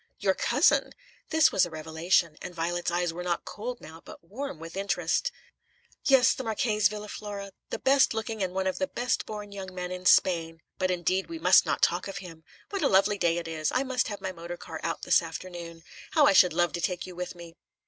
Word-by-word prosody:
"Your - - +2
cousin!" - - +2 0.4
This 320 -1 +4
was - - +3
a 175 - 0
revelation, 160 +1 0
and 180 -1 -7
Violet's 175 +1 -1
eyes 175 -1 0
were 175 - -6
not 175 -1 -2
cold 240 +3 -6
now, 160 +1 -12
but - - -12
warm 235 - -6
with 165 +2 -9
interest. 195 +1 0 0.7
"Yes, 265 -2 +6
the 260 - -5
Marchese 215 -2 +1
Villa 210 0 -7
Fora, 200 -1 -7 0.2
the - - -3
best 270 -3 +3
looking 220 -1 -3
and 185 -1 -2
one 190 0 0
of 190 - -1
the 280 - 0
best 245 -1 -1
born 210 -1 -7
young 190 -2 -8
men 180 0 -4
in 180 0 -3
Spain. 165 -4 +3 0.2
But 185 -1 +1
indeed 185 +1 0
we 335 - -6
must - - +5
not - - -1
talk - - +2
of 195 0 -6
him. 165 -4 -10 0.3
What 395 -2 -2
a - - +4
lovely 195 +1 +3
day 170 -2 +2
it 170 -1 -4
is! 155 -2 -2
I 255 - +2
must 255 -2 0
have 205 -3 -6
my 190 - -3
motor 170 0 -7
car 160 -2 -8
out 165 - -3
this - - +4
afternoon. 170 0 -8 0.3
How 305 -3 +6
I 295 - +5
should 180 - +6
love 175 +1 +1
to 175 - -3
take 180 0 -2
you 185 - -10
with 180 0 -5
me!" 170 -1 -11
185 Hz, 225 wpm, -28 LUFS, 170-210 Hz, 0.7 s, Yes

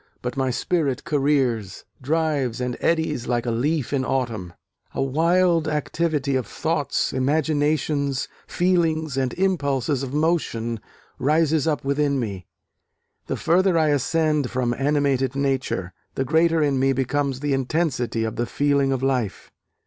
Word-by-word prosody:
but 125 - -3
my 135 -1 0
spirit 140 +1 -1
careers, 135 -9 0 0.2
drives 145 -4 0
and 125 -1 -2
eddies 160 -6 0
like 120 -1 0
a 120 - 0
leaf 145 +4 -1
in 135 -2 +1
autumn; 115 -9 -2 0.4
a - - 0
wild 165 +4 +2
activity 150 -2 -1
of 130 -3 -1
thoughts, 155 -4 -1
imaginations, 145 0 0 0.2
feelings 165 -5 +1
and 130 -2 -1
impulses 145 -8 0
of 135 -2 -4
motion 140 -7 0 0.4
rises 155 +1 +2
up 150 -3 -1
within 140 0 +1
me.... 100 -7 -4 0.8
The - - -2
further 180 +1 +3
I 155 -1 +3
ascend 150 -1 +1
from 125 -2 0
animated 135 -1 +1
nature... 135 -9 -1 0.2
the 135 - -1
greater 160 +3 +3
in 140 -2 +1
me 135 +1 +3
becomes 135 +1 -1
the 145 0 -1
intensity 130 -4 0
of 110 -1 -3
the 120 - -1
feeling 140 0 +1
of 130 -1 -1
life. 125 -7 -1
140 Hz, 140 wpm, -23 LUFS, 130-155 Hz, 0.8 s, further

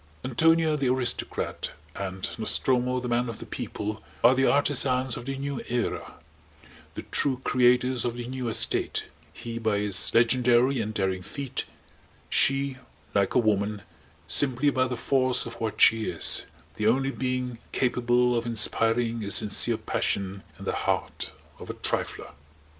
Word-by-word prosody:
Antonia 160 +5 +3
the 135 -4 0
Aristocrat 125 -1 -2 0.2
and 95 -1 -4
Nostromo 125 +2 +1
the 125 - -5
Man 120 0 0
of 115 - -6
the - - -9
People 105 +1 -5 0.2
are 120 +2 +7
the 135 +1 +2
artisans 130 -3 +1
of 120 - -8
the 135 0 -3
New 140 -1 -4
Era, 120 -2 -2 0.8
the - - -6
true 130 -3 +1
creators 125 0 +3
of 120 -1 -2
the 120 -1 -5
New 130 -2 -3
State; - - 0 0.3
he 115 0 -6
by 110 -2 +1
his 100 -1 +3
legendary 125 +2 +3
and 110 0 -4
daring 95 -2 -1
feat, 140 +6 -4 0.7
she, 135 -1 +2 0.4
like 100 -1 +1
a - - +5
woman, 105 -2 0 0.4
simply 135 - +2
by 130 -1 +1
the 125 -1 -4
force 130 0 +2
of 115 0 -9
what 110 -2 -3
she 110 -1 +5
is: - - +1 0.3
the 105 0 +1
only 135 +4 +2
being 125 -2 -3
capable 125 -1 +2
of 115 0 -1
inspiring 115 0 +1
a 100 - -4
sincere 100 +1 +3
passion 100 0 -2 0.2
in - - -10
the - - 0
heart - - -2 0.3
of - - -10
a - - -4
trifler. - - -3
120 Hz, 155 wpm, -26 LUFS, 110-130 Hz, 0.8 s, are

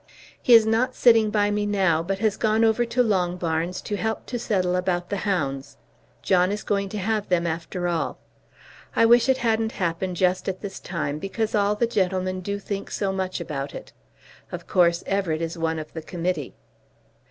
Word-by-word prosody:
He 245 - +7
is 225 -1 +7
not 225 +3 +1
sitting 225 -3 +5
by 205 -1 +1
me 205 0 0
now 190 -6 +2
but 190 +3 -2
has 210 0 +1
gone 220 +1 +2
over 225 +2 +3
to 235 +2 +1
Longbarns 180 -4 -1
to 205 - -3
help 220 +2 -2
to 245 - -4
settle 185 -5 0
about 180 0 -1
the 200 - 0
hounds. 140 -8 -2 0.5
John 185 0 +3
is 210 +1 -3
going 200 -1 -1
to 215 - -5
have 210 +1 -1
them 175 -2 +2
after 170 +2 -3
all. 170 -2 -1 0.8
I 230 - +5
wish 240 +2 +5
it 260 - +4
hadn't 225 0 +1
happened 180 0 -2
just 185 +2 +1
at 185 - -5
this 200 -2 -6
time 150 -5 -3
because 215 +5 -3
all 205 -1 +2
the 235 - +1
gentlemen 185 -4 -1
do 200 +2 -3
think 200 0 -5
so 195 -2 -2
much 190 -1 -2
about 140 -4 -5
it. - - -10 0.6
Of - - -6
course 170 -2 +2
Everett 190 -5 0
is 165 +1 -3
one 165 -1 -1
of 155 -1 -7
the 160 - -5
committee. 175 +2 -3
190 Hz, 190 wpm, -24 LUFS, 175-215 Hz, 0.8 s, He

